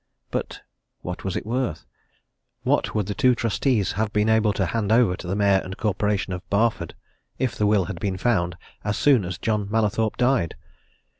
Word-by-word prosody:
But - - -4 0.4
what 90 0 -6
was 95 -2 -3
it - - -3
worth? 120 -7 -2 0.8
What - - +1
would 105 -2 +1
the 100 - -3
two 125 +1 +3
trustees 115 -1 +1
have 110 0 -1
been 105 0 +1
able 110 -1 +3
to 95 - 0
hand 110 +2 -1
over 115 -5 +4
to 90 - -9
the 95 - -1
Mayor 100 -1 +4
and 95 0 -7
Corporation 105 -2 0
of 90 - -4
Barford, 110 +3 0 0.4
if 130 -5 -1
the 105 - +1
will 105 -3 +3
had 90 -3 -6
been 95 -1 -2
found 90 -6 0 0.3
as 105 0 -1
soon 135 -8 +4
as 90 0 -4
John 105 -3 -1
Mallathorpe 110 0 0
died? 125 - +1
105 Hz, 190 wpm, -24 LUFS, 95-115 Hz, 0.8 s, over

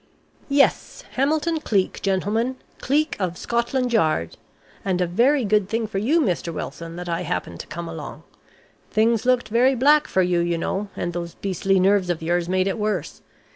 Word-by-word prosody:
"Yes, 280 0 +2
Hamilton 310 +4 +1
Cleek, 200 -10 0
gentlemen. 210 +6 0 0.2
Cleek 300 +4 +1
of 180 -3 -2
Scotland 240 +1 -1
Yard. 155 - +1 0.5
And 185 -2 0
a 180 - +2
very 240 +9 +2
good 210 -1 +2
thing 225 +1 -1
for 200 -2 -3
you, 280 +11 +2
Mr. 180 - 0
Wilson, 165 +1 -6
that 175 0 -6
I 170 0 -1
happened 90 - -4
to - - -7
come 170 +1 -6
along. 160 -2 -8 0.7
Things 225 +1 +2
looked 250 -3 +2
very 250 +4 +3
black 295 +4 +4
for 190 - +2
you, 180 -1 +1
you 170 0 0
know, 195 +4 -2
and 175 - -3
those 170 -1 -5
beastly 195 0 0
nerves 190 -1 +3
of 165 -2 -2
yours 175 +1 0
made 185 0 +2
it 195 +3 -2
worse. 210 -6 -2
195 Hz, 175 wpm, -23 LUFS, 175-240 Hz, 0.7 s, black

